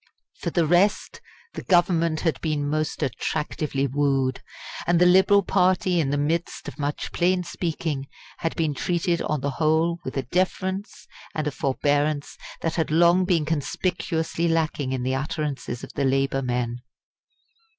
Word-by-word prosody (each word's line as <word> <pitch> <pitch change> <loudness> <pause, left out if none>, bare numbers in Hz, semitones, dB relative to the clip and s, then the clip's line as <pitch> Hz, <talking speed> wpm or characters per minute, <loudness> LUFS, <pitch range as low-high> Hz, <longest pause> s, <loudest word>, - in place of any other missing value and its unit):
For - - -2
the 170 -2 +1
rest, 175 +6 +2 0.3
the - - -5
Government 170 -3 +2
had 165 -3 0
been 150 -3 -1
most 155 +1 -1
attractively 140 +1 -2
wooed; 135 -1 0 0.5
and 175 0 +4
the 180 - +6
Liberal 190 +3 +5
party 185 -1 +2
in 145 -4 +1
the 145 - 0
midst 160 +4 -2
of - - -8
much 145 0 -3
plain 180 +1 +1
speaking 160 -5 -3 0.3
had 165 - -2
been 160 -3 0
treated 170 +3 0
on 150 -3 -1
the 140 +1 -1
whole 160 +3 +1
with 130 - -5
a 135 - 0
deference 185 - -2 0.3
and 155 - -1
a 150 - 0
forbearance 145 +3 0 0.3
that 165 - -2
had 160 - 0
long 170 +3 +4
been 170 -5 +2
conspicuously 165 +2 -1
lacking 160 -5 0
in 130 -2 -2
the 130 +1 0
utterances 140 -2 -3
of - - -9
the 140 - -1
Labour 135 0 +1
men. 120 -1 -2
155 Hz, 155 wpm, -24 LUFS, 140-175 Hz, 0.5 s, the